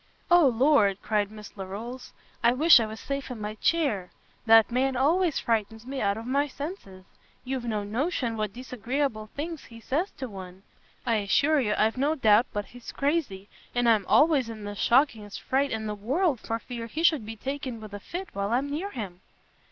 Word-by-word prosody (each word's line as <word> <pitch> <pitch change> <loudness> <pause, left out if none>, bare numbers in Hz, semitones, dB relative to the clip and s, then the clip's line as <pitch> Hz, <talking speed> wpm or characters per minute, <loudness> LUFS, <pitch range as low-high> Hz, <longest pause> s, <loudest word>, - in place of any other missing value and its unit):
"O 345 -4 +7
Lord," 240 -5 +3
cried 210 -2 0
Miss 210 -1 -12
Larolles, 210 +6 -7 0.3
"I 235 +1 +4
wish 305 +2 +7
I 225 - -1
was 220 +1 -8
safe 275 -1 -4
in 245 -3 -6
my 210 0 -4
chair! 220 - 0 0.4
that 225 +1 +7
man 260 +2 +1
always 320 +5 +2
frightens 225 0 -1
me 265 +1 -4
out 200 0 +1
of 225 - -7
my 280 +3 +1
senses. 275 - -8 0.4
You've 260 -1 -3
no 215 -3 -1
notion 240 - -1
what 215 -2 -2
disagreeable 250 -1 -3
things 320 +1 -5
he 230 -1 -13
says 300 - -1
to 260 - -4
one. 190 -3 -10 0.4
I 230 -2 +2
assure 285 +9 +2
you 210 -5 +1
I've 220 +3 +2
no 290 +4 +1
doubt 220 -3 +4
but 205 0 -3
he's 245 -1 -9
crazy; 275 - -1 0.3
and 245 0 +2
I'm 215 -4 +3
always 295 -6 +4
in 220 -2 -8
the 205 0 -5
shockingest 225 -3 +1
fright 275 +2 0
in 220 -2 -3
the 210 - -2
world 265 - 0
for 225 - -3
fear 230 0 -7
he 310 +8 -4
should 310 -8 +4
be 225 +1 -7
taken 265 0 -5
with 215 -2 -10
a 205 - -5
fit 360 - -6
while 200 0 -2
I'm 275 +4 0
near 340 +8 -3
him." 195 - -7
235 Hz, 195 wpm, -27 LUFS, 210-280 Hz, 0.4 s, O